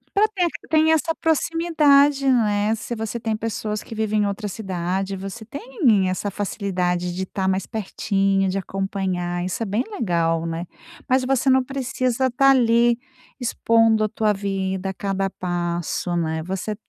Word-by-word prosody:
Pra 415 Hz, +2 st, +5 dB
ter 360 Hz, -2 st, +2 dB, 0.2 s
tem 315 Hz, 0 st, +4 dB
essa 320 Hz, +1 st, +1 dB
proximidade, 300 Hz, -4 st, +3 dB
né. 215 Hz, -3 st, +2 dB
Se 225 Hz, +2 st, -6 dB
você 225 Hz, +1 st, -4 dB
tem 225 Hz, -1 st, -1 dB
pessoas 215 Hz, -1 st, -3 dB
que 225 Hz, -, -9 dB
vivem 215 Hz, -1 st, 0 dB
em -, -, +2 dB
outra 200 Hz, +1 st, -3 dB
cidade, 190 Hz, -1 st, -3 dB
você 195 Hz, +4 st, -7 dB
tem 275 Hz, -, +1 dB
essa 185 Hz, +2 st, -2 dB
facilidade 180 Hz, -3 st, -2 dB
de 190 Hz, -, -2 dB
estar 190 Hz, 0 st, -3 dB
mais 190 Hz, 0 st, 0 dB
pertinho, 195 Hz, -2 st, 0 dB
de 190 Hz, +1 st, -1 dB
acompanhar. 185 Hz, -2 st, -2 dB
Isso 185 Hz, +5 st, -2 dB
é -, -, -2 dB
bem 210 Hz, +5 st, 0 dB
legal, 165 Hz, -, 0 dB
né. 165 Hz, +1 st, -4 dB, 0.4 s
Mas 255 Hz, 0 st, +3 dB
você 270 Hz, 0 st, +2 dB
não 260 Hz, 0 st, +4 dB
precisa 260 Hz, -1 st, -1 dB
estar 275 Hz, +2 st, +4 dB
ali 235 Hz, -2 st, +4 dB, 0.4 s
expondo 225 Hz, -2 st, +3 dB
a 215 Hz, -, +1 dB
tua 215 Hz, 0 st, +1 dB
vida 195 Hz, -1 st, -2 dB
a -, -, -4 dB
cada 195 Hz, -1 st, -2 dB
passo, 175 Hz, -1 st, -2 dB
né. 160 Hz, -1 st, -1 dB
Você 190 Hz, +4 st, -3 dB
210 Hz, 160 wpm, -22 LUFS, 190-245 Hz, 0.4 s, Pra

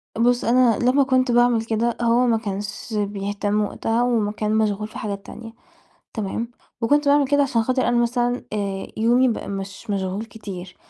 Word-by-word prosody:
بُصّ، 240 Hz, +2 st, +2 dB
أنا 240 Hz, -1 st, +4 dB
لما 255 Hz, +3 st, +3 dB
كنت 255 Hz, -1 st, +2 dB
باعمل 240 Hz, -1 st, +3 dB
كده، 230 Hz, +1 st, 0 dB
هو 235 Hz, +1 st, +3 dB
ما 230 Hz, -2 st, +3 dB
كانش 205 Hz, +1 st, -5 dB
بيهتم 205 Hz, 0 st, -1 dB
وقتها 225 Hz, +3 st, -1 dB
وما 225 Hz, -4 st, +1 dB
كان 215 Hz, 0 st, -1 dB
مشغول 210 Hz, -1 st, 0 dB
في -, -, -11 dB
حاجات 200 Hz, -2 st, -5 dB
تانية، 225 Hz, 0 st, -10 dB, 0.6 s
تمام، 220 Hz, +2 st, -3 dB, 0.3 s
وكنت 290 Hz, +5 st, +2 dB
باعمل 285 Hz, -1 st, +4 dB
كده 285 Hz, 0 st, +3 dB
عشان 240 Hz, -5 st, +1 dB
خاطر 255 Hz, +2 st, 0 dB
أنا 240 Hz, -, +2 dB
مثلًا 245 Hz, +1 st, 0 dB
آآ، 200 Hz, -2 st, -3 dB
يومي 240 Hz, +4 st, +3 dB
بقى 230 Hz, -, -3 dB
مش 195 Hz, +2 st, -6 dB
مشغول 195 Hz, +1 st, -2 dB
كتير، 195 Hz, -5 st, -9 dB
225 Hz, 170 wpm, -22 LUFS, 205-245 Hz, 0.6 s, أنا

